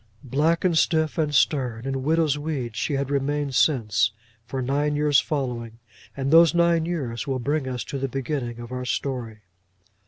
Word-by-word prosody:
Black, 150 +7 +1
and 175 -2 +3
stiff, 160 0 +2
and 150 -2 +1
stern, 130 -5 +1
in 135 -1 -2
widow's 155 +1 +2
weeds, 145 -6 -4
she 145 - -1
had 140 0 -1
remained 140 0 -1
since, 120 -5 +2 0.4
for 135 - -4
nine 145 +3 0
years 145 -1 +4
following, 120 -6 -3 0.4
and 135 0 -1
those 165 +1 +6
nine 170 -1 +3
years 140 -7 -3
will 135 -1 0
bring 140 +2 -1
us 125 -2 -3
to 140 - -5
the 135 - -1
beginning 130 -2 -3
of 120 0 -9
our 125 0 -4
story. 125 -4 -3
140 Hz, 175 wpm, -24 LUFS, 125-150 Hz, 0.4 s, those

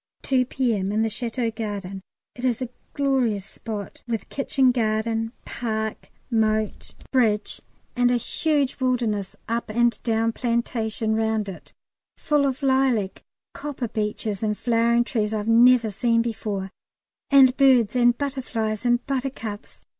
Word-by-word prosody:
2 255 -2 +2
P.M. 225 -8 0
In 215 +1 +1
the 225 - +1
Château 230 +1 -2
garden. 200 -3 -5 0.3
It 245 - -10
is 250 -3 +1
a 255 -2 -4 0.3
glorious 255 -8 +1
spot, 215 -1 -7
with 230 -2 -3
kitchen 270 -2 +2
garden, 225 -1 0
park, 220 -2 -3 0.2
moat 220 -1 0 0.2
bridge, 220 -5 +1 0.3
and 245 0 +3
a 245 - +3
huge 285 +3 0
wilderness 235 -6 0
up 230 0 -2
and 235 +1 +1
down 225 0 +1
plantation 230 -2 -1
round 220 -1 0
it, 190 - -9 0.5
full 295 -2 +2
of 270 +1 -3
lilac, 260 -7 +1 0.3
copper 280 -4 -4
beeches, 210 -1 -2
and 210 -1 0
flowering 235 0 +2
trees 220 -3 -1
I've 210 0 -3
never 235 -1 +5
seen 230 +3 +2
before, 210 -4 -3 0.6
and 265 -2 +7
birds 255 -5 +4
and 240 -1 +4
butterflies 245 -5 -2
and 240 0 +2
buttercups. 255 -6 -5
230 Hz, 135 wpm, -24 LUFS, 215-255 Hz, 0.6 s, and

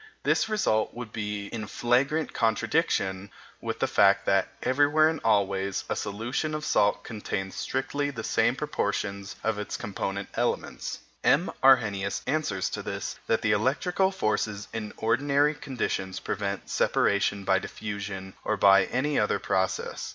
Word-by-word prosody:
This 220 - +2
result 205 - +1
would 120 -3 -7
be 105 -1 -3
in 110 -2 -5
flagrant 135 +9 +1
contradiction 100 -3 0 0.3
with - - -3
the - - +1
fact - - +4
that, - - +3 0.2
everywhere 145 +4 +4
and 160 -1 -3
always, 100 -3 +1
a - - 0
solution 120 +9 -2
of 155 0 -4
salt 100 -8 +2
contains 95 -4 -4
strictly 145 +2 -2
the 115 -6 -6
same - - +2
proportions 100 -1 -2
of 110 -2 0
its 105 - -4
component 100 -2 -4
elements. - - -2 0.2
M. 150 +7 +3
Arrhenius 105 -7 +3
answers 125 -12 0
to - - -3
this - - -5
that 115 - +1
the 110 - +3
electrical 135 - +2
forces 110 - -1
in 105 -2 -4
ordinary 140 +6 +2
conditions 120 -9 -3
prevent 100 -1 -3
separation 100 0 +1
by 95 0 +3
diffusion 100 -2 -6
or 110 - 0
by 100 -1 +6
any 145 +3 0
other 105 - +2
process. 95 -1 -1
110 Hz, 145 wpm, -27 LUFS, 100-135 Hz, 0.3 s, by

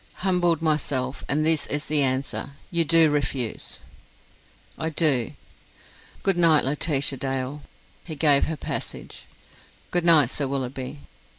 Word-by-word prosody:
"Humbled 175 -3 +2
myself! 140 -4 -1
And 155 +2 +1
this 160 -1 +2
is 145 +1 -2
the 150 -1 +4
answer! 135 +1 -1 0.2
You 170 -1 +3
do 165 -1 +4
refuse?" 135 -5 -2 1.0
"I 160 - -3
do." 145 -7 +1 0.9
"Good 195 -3 +1
night, 165 -5 +4
Laetitia 140 -1 0
Dale." 135 +2 -3 0.4
He 160 - -7
gave 145 -1 +4
her 160 - -4
passage. - - -6 0.6
"Good 175 -1 0
night, 155 -7 +6
Sir 140 - -2
Willoughby." 130 +1 -5
150 Hz, 125 wpm, -24 LUFS, 135-160 Hz, 1.0 s, night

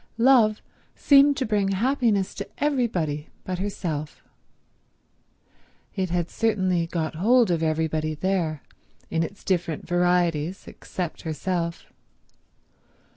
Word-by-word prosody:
Love 230 -3 +4 0.3
seemed 280 0 +5
to 265 - 0
bring 210 -2 +1
happiness 215 -1 +1
to 200 - -7
everybody 205 - -1
but 185 -1 -4
herself. 170 -7 -4 1.7
It 190 -2 -1
had 175 -1 -1
certainly 185 -7 0
got 165 -2 -2
hold 225 +6 +3
of 165 -2 0
everybody 155 -1 0
there, 165 -4 -1 0.5
in 165 - +1
its 195 +5 -5
different 175 -4 -1
varieties, 175 -1 +1
except 175 -3 -6
herself. 170 +1 -3
180 Hz, 105 wpm, -25 LUFS, 165-215 Hz, 1.7 s, seemed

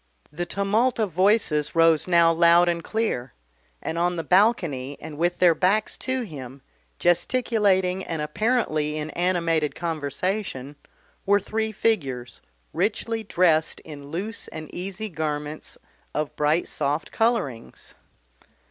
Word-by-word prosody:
The 175 +3 -4
tumult 205 +7 +1
of 215 -5 0
voices 170 -5 +2
rose 165 -1 +4
now 170 -2 +5
loud 170 +1 +5
and 170 -1 0
clear, 190 - -2 0.5
and 165 - -3
on 175 +1 +1
the 165 - -3
balcony 170 - +2
and 155 -1 -8
with 175 +3 0
their 175 -2 +5
backs 195 +6 +1
to 260 -1 -2
him, 135 - -9 0.3
gesticulating 190 -1 +2
and 165 - -4
apparently 155 -3 0
in 155 0 -4
animated 170 -4 0
conversation, 155 -2 -3 0.5
were 200 +1 +4
three 220 +2 -2
figures, 135 - -1 0.3
richly 220 +5 -1
dressed 170 -5 +2
in 145 -2 -10
loose 200 +7 -4
and 155 -1 -9
easy 195 +4 -5
garments 150 -3 -4 0.4
of 150 -1 -2
bright 150 +3 +1
soft 145 +1 -2
colourings. 225 - -2
170 Hz, 125 wpm, -24 LUFS, 150-205 Hz, 0.5 s, now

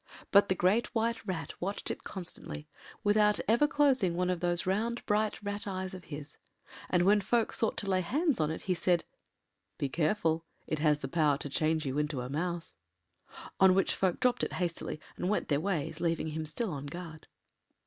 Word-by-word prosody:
But 200 0 +6
the 190 - +3
Great 190 +7 +3
White 230 0 0
Rat 160 -6 -3
watched 195 +3 -2
it - - -6
constantly, 170 -4 -6 0.4
without 210 0 +4
ever 235 +7 +4
closing 265 - +3
one 180 +1 +1
of 180 - -1
those 175 0 0
round 225 +6 -1
bright 210 +1 +1
rat’ 205 +1 -3
eyes 185 -1 -3
of 185 -2 -9
his, 145 -1 -8 0.5
and 180 -1 +3
when 205 +1 +5
folk 225 +3 +1
sought 225 - +1
to 205 - -1
lay 185 -1 +2
hands 290 - +1
on 155 -1 +2
it 160 - -4
he 185 - +1
said— 175 0 +2 0.7
“Be 140 - -1
careful: 160 +1 +1 0.2
it 155 - -2
has 150 -1 +3
the 135 - -5
power 150 -1 +2
to 145 - -4
change 155 +2 +1
you 135 +2 -1
into 150 -3 -1
a 125 - -5
mouse.” 170 +3 -3 0.8
On 190 -1 +7
which 195 - +3
folk 185 -3 0
dropped 250 -1 +2
it - - -2
hastily 170 -3 -2 0.2
and 180 - -1
went 210 - 0
their 145 -1 +2
ways, 165 -4 -2
leaving 165 -2 0
him 155 0 -4
still 205 +7 -2
on 145 -1 -5
guard. 160 0 -8
180 Hz, 195 wpm, -31 LUFS, 155-205 Hz, 0.8 s, On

